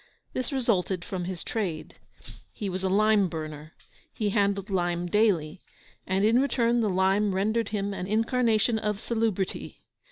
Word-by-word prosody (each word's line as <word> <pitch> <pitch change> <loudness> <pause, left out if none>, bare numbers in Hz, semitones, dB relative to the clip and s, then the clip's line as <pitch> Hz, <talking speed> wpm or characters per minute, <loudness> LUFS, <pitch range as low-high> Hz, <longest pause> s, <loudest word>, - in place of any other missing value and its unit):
This 255 - -2
resulted 195 -9 0
from 180 -2 -4
his 180 -1 -5
trade. 180 -9 -3 0.6
He 205 - -4
was 185 0 -3
a 190 - 0
lime 210 -1 +3
burner; 155 -1 -7 0.4
he 210 -2 -1
handled 200 -1 0
lime 175 -2 0
daily; 180 -5 +1 0.5
and 190 +2 +2
in 230 +4 +4
return 240 -3 +2
the 215 - +1
lime 190 +2 +2
rendered 215 +3 0
him 200 -1 -2
an 185 -1 -4
incarnation 225 +1 +2
of 210 -1 -2
salubrity. 220 -5 -2
200 Hz, 150 wpm, -27 LUFS, 185-220 Hz, 0.6 s, in